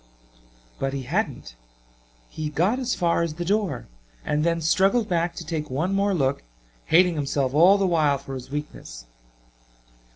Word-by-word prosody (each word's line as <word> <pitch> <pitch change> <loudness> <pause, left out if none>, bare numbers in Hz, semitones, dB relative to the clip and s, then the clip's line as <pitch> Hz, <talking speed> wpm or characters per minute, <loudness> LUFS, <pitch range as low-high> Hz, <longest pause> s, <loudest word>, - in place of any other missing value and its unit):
But 135 0 -2
he 135 -1 -4
hadn't. 140 - -3 0.7
He 155 - -5
got 180 - +1
as 255 -1 -1
far 170 -2 +1
as 165 -2 -2
the 175 +1 -4
door 195 - -1 0.4
and 150 0 0
then 170 0 +1
struggled 195 +8 +2
back 170 -1 0
to 170 - -7
take 155 -2 -4
one 160 +9 -1
more 200 0 +1
look, 135 -4 0 0.4
hating 180 +2 +4
himself 140 -3 -1
all 175 +7 +6
the 195 - +1
while 155 -6 +2
for 135 0 -9
his 130 -1 -7
weakness. 140 - -7
165 Hz, 160 wpm, -24 LUFS, 140-185 Hz, 0.7 s, all